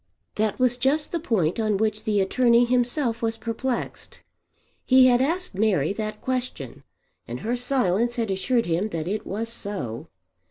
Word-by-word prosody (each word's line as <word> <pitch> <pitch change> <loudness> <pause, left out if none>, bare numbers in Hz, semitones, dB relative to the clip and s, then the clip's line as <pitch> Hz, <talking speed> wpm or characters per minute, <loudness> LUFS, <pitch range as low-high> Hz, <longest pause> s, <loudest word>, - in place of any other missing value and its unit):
That 215 -1 -1
was 250 -1 +2
just 275 +4 +1
the 340 - -1
point 215 - 0
on 215 -2 +1
which 215 0 -1
the 210 -3 +2
attorney 235 +4 +3
himself 245 0 0
was 225 -1 -1
perplexed. 235 +3 -4 0.6
He 260 0 +6
had 245 -1 +4
asked 340 - -1
Mary 195 -5 +1
that 215 0 -5
question, 250 - -4 0.5
and 120 +2 -6
her 235 +3 -1
silence 240 -3 0
had 225 -4 -1
assured 230 +6 0
him 175 +5 0
that 165 -5 -4
it 210 +3 -3
was 220 +3 -3
so. 200 - -5
225 Hz, 160 wpm, -24 LUFS, 200-250 Hz, 0.6 s, He